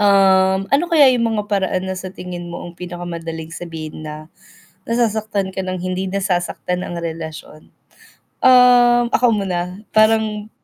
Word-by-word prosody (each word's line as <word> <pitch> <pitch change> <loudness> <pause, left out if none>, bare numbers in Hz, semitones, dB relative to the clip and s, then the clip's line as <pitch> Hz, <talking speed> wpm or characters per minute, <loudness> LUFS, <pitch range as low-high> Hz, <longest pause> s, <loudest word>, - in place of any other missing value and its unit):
um, 190 -1 +4
ano 285 +5 +4
kaya 290 -5 +6
yung 230 -2 0
mga 210 - -1
paraan 190 -2 0
na - - -2
sa 185 0 -6
tingin 175 -2 -7
mo 175 - -7
ang 175 - -9
pinakamadaling 170 -2 -6
sabihin 160 -3 -7
na 155 +1 -8 0.6
nasasaktan 220 -4 0
ka - - -7
ng 185 0 -3
hindi 185 +1 -2
nasasaktan 180 -1 -2
ang 175 - -6
relasyon. 160 -2 -8 0.8
Ah, 245 -1 +6
ako 235 -3 +3
muna? 180 +1 -4
Parang 215 -1 +2
190 Hz, 140 wpm, -19 LUFS, 175-220 Hz, 0.8 s, kaya